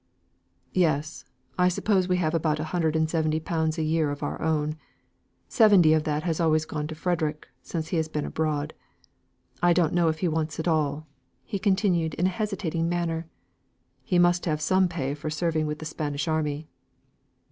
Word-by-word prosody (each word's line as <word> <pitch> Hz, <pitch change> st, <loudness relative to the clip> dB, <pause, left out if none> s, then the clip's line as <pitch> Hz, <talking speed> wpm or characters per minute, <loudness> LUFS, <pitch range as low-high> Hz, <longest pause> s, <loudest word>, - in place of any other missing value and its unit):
"Yes. 155 Hz, -3 st, 0 dB, 0.3 s
I 180 Hz, -, +5 dB
suppose 185 Hz, +1 st, +1 dB
we 180 Hz, -1 st, +2 dB
have 160 Hz, -3 st, 0 dB
about 155 Hz, -2 st, +1 dB
a -, -, -1 dB
hundred 160 Hz, -3 st, +1 dB
and 160 Hz, 0 st, +2 dB
twenty 155 Hz, -1 st, 0 dB
pounds 160 Hz, 0 st, -1 dB
a 160 Hz, -, 0 dB
year 155 Hz, -1 st, +1 dB
of 145 Hz, 0 st, -5 dB
our -, -, -3 dB
own. 155 Hz, -1 st, 0 dB, 0.7 s
Seventy 200 Hz, -, +6 dB
of 155 Hz, 0 st, +1 dB
that 150 Hz, 0 st, -1 dB
has 165 Hz, -1 st, -1 dB
always 155 Hz, -2 st, +2 dB
gone 150 Hz, -1 st, -4 dB
to 160 Hz, -, -6 dB
Frederick, 155 Hz, -2 st, -2 dB
since 160 Hz, -2 st, -4 dB
he 175 Hz, -, 0 dB
has 160 Hz, -1 st, 0 dB
been 150 Hz, -1 st, -3 dB
abroad. 155 Hz, -1 st, -2 dB, 0.9 s
I 175 Hz, 0 st, +5 dB
don't 170 Hz, -3 st, +2 dB
know 175 Hz, -1 st, +3 dB
if 160 Hz, -1 st, -1 dB
he 180 Hz, -, +2 dB
wants 160 Hz, -1 st, -2 dB
it 160 Hz, -, -3 dB
all," 155 Hz, -2 st, 0 dB, 0.4 s
he 200 Hz, -4 st, -4 dB
continued 190 Hz, -5 st, +1 dB
in 175 Hz, -, 0 dB
a -, -, +4 dB
hesitating 180 Hz, -5 st, -2 dB
manner. 170 Hz, -2 st, -2 dB, 0.8 s
"He 185 Hz, -5 st, +1 dB
must 175 Hz, 0 st, +3 dB
have 155 Hz, -3 st, 0 dB
some 185 Hz, +5 st, +3 dB
pay 145 Hz, -6 st, -3 dB
for 150 Hz, +1 st, -5 dB
serving 155 Hz, 0 st, 0 dB
with 150 Hz, 0 st, -3 dB
the 155 Hz, -, -8 dB
Spanish 150 Hz, -1 st, -3 dB
army." 155 Hz, -1 st, -1 dB
160 Hz, 185 wpm, -26 LUFS, 155-175 Hz, 0.9 s, Seventy